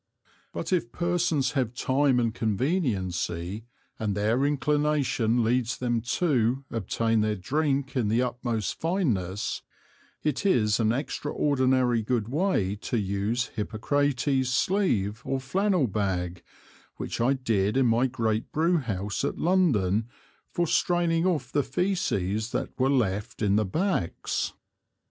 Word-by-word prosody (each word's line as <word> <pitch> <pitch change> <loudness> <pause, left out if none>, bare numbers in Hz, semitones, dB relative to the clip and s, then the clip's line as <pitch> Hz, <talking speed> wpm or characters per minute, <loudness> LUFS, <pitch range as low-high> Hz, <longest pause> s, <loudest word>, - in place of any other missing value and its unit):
But - - -3
if 155 -10 0
Persons 170 -6 0
have 125 -5 -1
Time 130 0 +2
and 115 -2 0
Conveniency, 105 - -1 0.3
and 105 -2 -1
their 115 +7 +2
Inclination 145 -5 +1
leads 120 +1 +1
them 120 -2 0 0.2
to, 130 -5 +1
obtain 115 +1 0
their 105 0 +1
Drink 140 - -1
in 120 -5 +1
the 110 +3 +2
utmost 120 -3 -2
Fineness, 115 - -1 0.6
it 150 0 -1
is 110 - +3
an 110 -1 +3
extraordinary 130 -2 +1
good 110 -1 -1
way 140 - +1
to 115 - -3
use 105 +4 -1
Hippocrates 130 +4 0
Sleeve 120 - +1
or 135 - -1
Flannel 185 +4 +1
Bag, 95 -5 -2 0.6
which - - -4
I 125 +4 +3
did 110 -4 0
in 135 - +4
my 120 +2 +3
great 115 -3 -1
Brew 170 +3 +2
house 105 - -3
at 140 - -1
London 115 - +2 0.4
for 175 - 0
straining 170 0 +2
off 145 -9 -1
the 145 - +2
Feces 120 - -1
that - - -1
were 130 +1 +3
left 110 -4 0
in 100 -1 +3
the 105 0 +2
Backs. 150 - -1
125 Hz, 130 wpm, -27 LUFS, 110-145 Hz, 0.6 s, in